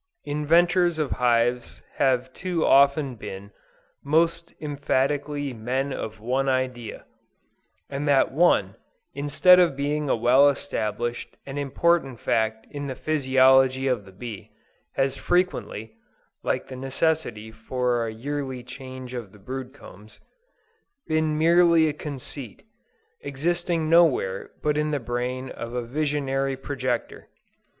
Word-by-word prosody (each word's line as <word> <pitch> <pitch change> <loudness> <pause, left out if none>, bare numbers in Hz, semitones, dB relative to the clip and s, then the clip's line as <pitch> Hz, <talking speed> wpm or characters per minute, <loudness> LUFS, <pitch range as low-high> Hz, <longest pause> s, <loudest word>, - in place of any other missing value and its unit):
Inventors 170 +4 +2
of 150 -3 -1
hives 120 0 +1
have 130 -1 +1
too 180 -3 -1
often 140 0 +4
been, 100 -3 -9 0.5
most 165 +3 +1
emphatically 145 -1 -1
"men 130 +5 -2
of 110 0 -6
one 130 +5 0
idea:" 130 -3 -2 0.8
and 140 +1 -4
that 140 -2 +3
one, 130 - +2 0.4
instead 145 +6 +5
of 175 -6 +3
being 145 +1 -1
a - - +3
well 125 +5 +5
established 120 -3 -3
and 140 +1 -5
important 140 -2 +1
fact 110 0 0
in 145 -1 -5
the 130 - -4
physiology 130 -3 +3
of 125 -6 0
the 95 - -14
bee, 105 0 -8 0.4
has 135 0 0
frequently, 175 - -1 0.5
(like - - -2
the 130 - -8
necessity 130 -4 -1
for 120 +1 -1
a - - -4
yearly 130 +2 -4
change 130 0 -9
of 115 -6 -6
the 105 - -16
brood 130 +5 -6
combs,) 105 -6 -15 0.9
been 155 -1 0
merely 170 0 +5
a 150 - -1
conceit, 140 - -8 0.6
existing 170 +3 -1
nowhere 155 - +3
but 150 0 +1
in 150 0 0
the 145 -1 -1
brain 125 +2 -3
of 115 +1 -7
a 125 - -1
visionary 135 0 -1
projector. 130 -3 -3
135 Hz, 125 wpm, -25 LUFS, 120-150 Hz, 0.9 s, instead